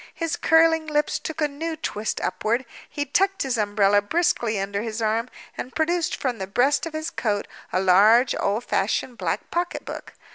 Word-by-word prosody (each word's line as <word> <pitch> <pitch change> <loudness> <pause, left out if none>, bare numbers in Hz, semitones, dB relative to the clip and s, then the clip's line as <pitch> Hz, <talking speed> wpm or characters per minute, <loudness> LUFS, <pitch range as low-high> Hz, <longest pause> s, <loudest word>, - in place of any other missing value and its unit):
His 330 -1 -2
curling 325 -1 +4
lips 300 -1 0
took 320 0 -6
a 300 - +3
new 320 +3 -4
twist 220 -8 -3
upward; 235 +4 -1 0.2
he 290 0 -3
tucked 390 +7 +1
his 265 -2 -1
umbrella 205 -1 +3
briskly 225 - 0
under 200 +1 -2
his 225 0 -4
arm; 225 +2 0 0.3
and 255 - -7
produced 335 +1 0
from 250 -5 -3
the 190 - -4
breast 270 - +2
of 325 - -8
his 315 +1 -3
coat 205 -3 -1 0.2
a 185 - +1
large 210 +7 +5
old 205 +4 0
fashioned 230 +5 -1
black - - -3
pocketbook. 350 +1 -4
250 Hz, 175 wpm, -24 LUFS, 210-315 Hz, 0.3 s, large